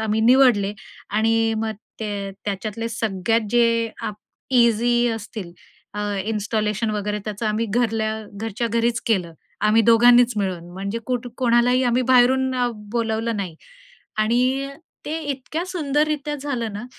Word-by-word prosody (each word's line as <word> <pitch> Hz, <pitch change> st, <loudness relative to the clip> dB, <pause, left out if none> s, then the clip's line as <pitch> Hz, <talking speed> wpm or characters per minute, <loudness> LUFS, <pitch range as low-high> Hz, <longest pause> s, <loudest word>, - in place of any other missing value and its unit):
आम्ही 220 Hz, 0 st, 0 dB
निवडले 230 Hz, -4 st, +4 dB, 0.4 s
आणि 225 Hz, +2 st, +2 dB, 0.2 s
मग 220 Hz, 0 st, -1 dB, 0.3 s
ते, 205 Hz, -2 st, -3 dB
त्याच्यातले 210 Hz, +3 st, -3 dB
सगळ्यात 225 Hz, -1 st, 0 dB
जे, 230 Hz, -1 st, +3 dB
अ‍ॅप 215 Hz, -2 st, -3 dB, 0.4 s
इझी 240 Hz, 0 st, +3 dB
असतील, 215 Hz, -4 st, -6 dB, 0.4 s
अ, 205 Hz, -, -3 dB, 0.2 s
इन्स्टॉलेशन 215 Hz, 0 st, -1 dB
वगैरे, 210 Hz, 0 st, -2 dB
त्याचं 215 Hz, +1 st, -4 dB
आम्ही 215 Hz, +2 st, 0 dB
घरल्या 225 Hz, -2 st, +1 dB, 0.3 s
घरच्या 225 Hz, +1 st, -2 dB
घरीच 230 Hz, +1 st, +1 dB
केलं. 185 Hz, -7 st, +1 dB, 0.3 s
आम्ही 220 Hz, +2 st, +5 dB
दोघांनीच 240 Hz, +1 st, +6 dB
मिळून 180 Hz, -4 st, -3 dB
म्हणजे 200 Hz, +4 st, -4 dB
कुठं 250 Hz, -1 st, -2 dB
कोणालाही 245 Hz, 0 st, +3 dB
आम्ही 245 Hz, +1 st, +2 dB
बाहेरून 260 Hz, +1 st, +4 dB, 0.4 s
बोलावलं 225 Hz, -1 st, -1 dB
नाही 185 Hz, -5 st, -4 dB, 0.6 s
आणि 250 Hz, +5 st, +1 dB, 0.4 s
ते 315 Hz, +2 st, -2 dB
इतक्या, 290 Hz, +3 st, -4 dB
सुंदर 300 Hz, -5 st, 0 dB
रित्या 295 Hz, -1 st, -2 dB
झालं 250 Hz, -6 st, -3 dB
ना 210 Hz, +4 st, -6 dB
230 Hz, 130 wpm, -22 LUFS, 210-245 Hz, 0.6 s, दोघांनीच